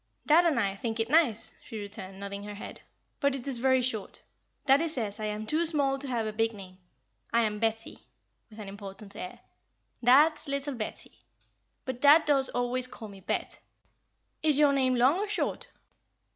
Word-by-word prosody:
"Dad 330 Hz, +4 st, +5 dB
and 300 Hz, -7 st, +2 dB
I 195 Hz, -3 st, 0 dB
think 225 Hz, +2 st, -4 dB
it 225 Hz, +3 st, -1 dB
nice," 295 Hz, -9 st, +3 dB
she 225 Hz, -, -8 dB
returned, 200 Hz, -2 st, -8 dB
nodding 200 Hz, 0 st, -6 dB
her 205 Hz, 0 st, -7 dB
head; 200 Hz, -, -9 dB, 0.4 s
"but 280 Hz, -1 st, +2 dB
it 270 Hz, 0 st, -7 dB
is 260 Hz, -4 st, -1 dB
very 260 Hz, 0 st, +3 dB
short. 220 Hz, -5 st, -2 dB, 0.4 s
Daddie 285 Hz, +4 st, +4 dB
says 225 Hz, -9 st, -3 dB
I 215 Hz, -, -3 dB
am 210 Hz, 0 st, -3 dB
too 310 Hz, +8 st, +1 dB
small 285 Hz, -4 st, +1 dB
to 280 Hz, -, -2 dB
have 235 Hz, -3 st, -1 dB
a 215 Hz, -, -3 dB
big 225 Hz, +1 st, 0 dB
name. 185 Hz, -2 st, -12 dB, 0.5 s
I 235 Hz, -, +3 dB
am 210 Hz, -1 st, -1 dB
Betty," 225 Hz, 0 st, -3 dB, 0.4 s
with 215 Hz, -, -15 dB
an 210 Hz, -2 st, -8 dB
important 200 Hz, 0 st, -9 dB
air. 180 Hz, -, -8 dB, 0.6 s
"Dad's 295 Hz, +6 st, +5 dB
little 280 Hz, +1 st, -2 dB
Betty. 215 Hz, -, -7 dB, 0.6 s
But 260 Hz, -1 st, -5 dB
dad 300 Hz, +3 st, +7 dB
does 275 Hz, -3 st, +3 dB
always 245 Hz, +1 st, -1 dB
call 240 Hz, -4 st, -10 dB
me 195 Hz, -1 st, -12 dB
Bet. -, -, -3 dB, 0.8 s
Is 305 Hz, -3 st, +4 dB
your 290 Hz, -1 st, +5 dB
name 260 Hz, -2 st, +2 dB
long 260 Hz, +8 st, +4 dB
or 415 Hz, 0 st, -2 dB
short?" 425 Hz, -, -2 dB
245 Hz, 185 wpm, -29 LUFS, 210-280 Hz, 0.8 s, dad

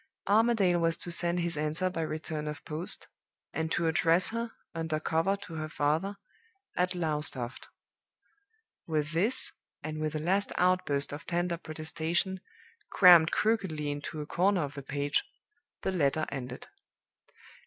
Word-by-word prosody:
Armadale 205 Hz, -4 st, +3 dB
was 165 Hz, -1 st, +1 dB
to 175 Hz, -, -2 dB
send 175 Hz, +1 st, +2 dB
his 170 Hz, -1 st, 0 dB
answer 155 Hz, +5 st, 0 dB
by 180 Hz, -3 st, -3 dB
return 155 Hz, -1 st, -4 dB
of 150 Hz, -1 st, -6 dB
post, 160 Hz, +3 st, -3 dB, 0.5 s
and 160 Hz, 0 st, -2 dB
to 170 Hz, -, 0 dB
address 165 Hz, +2 st, +4 dB
her, 230 Hz, 0 st, -3 dB, 0.2 s
under 160 Hz, -2 st, -2 dB
cover 165 Hz, +5 st, +1 dB
to 200 Hz, -4 st, -10 dB
her 155 Hz, -1 st, -4 dB
father, 165 Hz, +7 st, 0 dB, 0.6 s
at 180 Hz, +1 st, 0 dB
Lowestoft. 150 Hz, -7 st, 0 dB, 1.2 s
With 155 Hz, -2 st, -1 dB
this, 210 Hz, +11 st, +2 dB, 0.3 s
and 155 Hz, 0 st, -5 dB
with 155 Hz, 0 st, -2 dB
a -, -, -1 dB
last 190 Hz, +6 st, 0 dB
outburst 180 Hz, -7 st, +2 dB
of 145 Hz, -, -8 dB
tender 175 Hz, 0 st, -1 dB
protestation, 165 Hz, +4 st, -2 dB, 0.5 s
crammed 175 Hz, -4 st, +7 dB
crookedly 190 Hz, -9 st, 0 dB
into 145 Hz, +2 st, -5 dB
a -, -, -5 dB
corner 180 Hz, +2 st, +1 dB
of 140 Hz, -1 st, -5 dB
the 140 Hz, -, -7 dB
page, 145 Hz, +2 st, -1 dB, 0.6 s
the -, -, 0 dB
letter 155 Hz, -3 st, +1 dB
ended. 125 Hz, -2 st, -6 dB
165 Hz, 145 wpm, -30 LUFS, 150-180 Hz, 1.2 s, crammed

